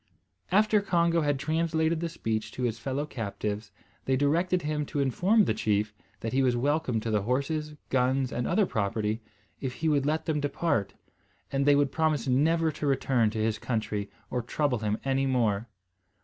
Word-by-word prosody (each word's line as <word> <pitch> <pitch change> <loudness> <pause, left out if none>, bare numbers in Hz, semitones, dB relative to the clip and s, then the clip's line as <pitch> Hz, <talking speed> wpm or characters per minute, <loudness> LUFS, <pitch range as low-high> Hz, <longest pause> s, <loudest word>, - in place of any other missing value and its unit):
After 210 +2 +4
Congo 170 -3 +2
had 145 -2 +1
translated 160 +2 0
the 170 0 -2
speech 110 -8 -3
to 125 - -4
his 115 -2 -1
fellow 135 +4 -2
captives, 105 -4 -4 0.4
they 130 - +2
directed 170 +6 +1
him 150 0 -1
to 145 - -3
inform 185 - +3
the - - +1
chief 105 0 0 0.3
that 115 - -3
he 135 - +3
was 125 -2 +3
welcome 140 -1 +1
to 115 - -3
the 105 -1 +2
horses, 145 +7 -1 0.2
guns, 130 0 +2
and 120 - -1
other 215 - +3
property, 110 - -1 0.4
if 130 -2 -4
he 160 +6 0
would 145 -2 +2
let 155 +1 0
them 155 -3 0
depart, 145 - -1 0.6
and 140 +1 0
they 145 - +7
would 140 -1 +2
promise 155 -6 +1
never 160 +5 +3
to 150 0 -4
return 130 -4 +2
to 110 0 -2
his 110 -1 0
country 110 -4 -2 0.2
or 125 - 0
trouble 125 +1 0
him 105 0 -1
any 135 0 +1
more. 115 -4 +1
135 Hz, 180 wpm, -28 LUFS, 115-155 Hz, 0.6 s, they